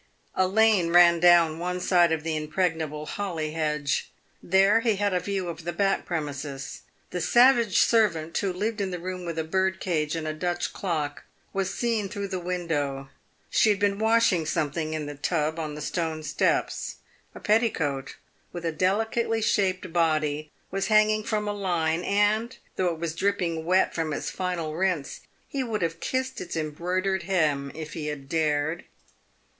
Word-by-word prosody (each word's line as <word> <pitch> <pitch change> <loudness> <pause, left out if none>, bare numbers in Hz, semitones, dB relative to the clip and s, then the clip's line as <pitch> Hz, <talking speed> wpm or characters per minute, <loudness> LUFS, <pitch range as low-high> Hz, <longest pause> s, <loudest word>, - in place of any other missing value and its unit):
A 185 0 +2
lane 210 -3 +4
ran 170 0 +6
down 170 -2 +5
one 180 +1 -2
side 175 -2 +3
of 160 -2 -1
the 160 -1 -1
impregnable 155 -1 -1
holly 165 -5 -3
hedge. 150 -2 -1 0.3
There 195 +4 +4
he 230 -2 +1
had 200 0 0
a 180 - +2
view 190 0 -3
of 165 -1 -6
the 175 - -2
back 195 +3 0
premises. 145 -5 -4 0.3
The 180 - -3
savage 240 -3 +5
servant, 170 -9 +3
who 195 - 0
lived 210 +4 -2
in 195 - -1
the 180 - -4
room 180 +1 -5
with 165 -1 -4
a 160 - 0
bird 190 +3 0
cage 155 -4 -1
and 160 -1 -3
a 155 - -2
Dutch 175 +2 -2
clock, 155 -6 -3 0.3
was 195 -1 -1
seen 225 -4 -1
through 200 0 -4
the 190 -1 -3
window. 155 -7 -2 0.4
She 220 - +4
had 205 - +3
been 200 0 +1
washing 220 -7 +3
something 155 0 -1
in 155 -1 -3
the 145 - -5
tub 155 +2 -1
on 155 -2 -4
the 150 - -7
stone 160 -2 -2
steps. 150 - 0 0.4
A - - -8
petticoat, 160 - 0 0.4
with 175 -1 -6
a 165 - +1
delicately 225 +6 0
shaped 185 -4 0
body, 155 -3 +1 0.2
was 195 +1 -1
hanging 215 0 +4
from 210 -1 -1
a 205 - -1
line, 175 -4 0
and, 210 +5 +1 0.2
though 185 - +1
it 165 - -5
was 165 -1 -3
dripping 170 -3 -1
wet 185 +2 +3
from 160 -2 -2
its - - -3
final 175 -4 -3
rinse, 175 -4 -1 0.3
he 275 -2 -2
would 215 -6 -2
have 165 0 -2
kissed 260 +4 -2
its 170 - -6
embroidered 180 +5 -1
hem 155 -7 0
if 155 -1 -7
he 155 -2 -4
had 145 -2 -5
dared. 155 +1 0
175 Hz, 175 wpm, -26 LUFS, 155-195 Hz, 0.4 s, ran